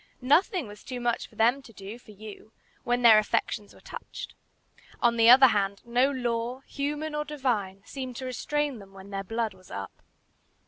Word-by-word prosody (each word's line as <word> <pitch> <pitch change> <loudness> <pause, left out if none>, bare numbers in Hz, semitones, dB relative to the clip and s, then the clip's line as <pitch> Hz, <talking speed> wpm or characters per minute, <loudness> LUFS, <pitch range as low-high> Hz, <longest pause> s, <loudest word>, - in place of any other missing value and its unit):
Nothing 335 - +3
was 205 0 -12
too 250 -1 -5
much 240 -1 -1
for - - -21
them 240 +5 +3
to 245 - -15
do 205 +2 -9
for 235 - -21
you 215 +1 -11 0.3
when 245 0 0
their 225 -2 +9
affections 210 -1 -1
were - - -17
touched. - - -8 0.7
On 235 -1 +3
the 230 0 +6
other 260 +1 +9
hand, 200 -2 0
no 245 +3 +3
law, 245 -1 -2
human 295 +3 -3
or 300 0 -1
divine, 235 -10 -2
seemed 260 -1 -6
to 260 - -6
restrain 285 +1 -2
them 195 -1 -14
when 195 +1 -12
their 195 0 -3
blood 225 +1 -2
was 185 -1 -19
up. 100 -1 -7
235 Hz, 185 wpm, -27 LUFS, 210-265 Hz, 0.7 s, their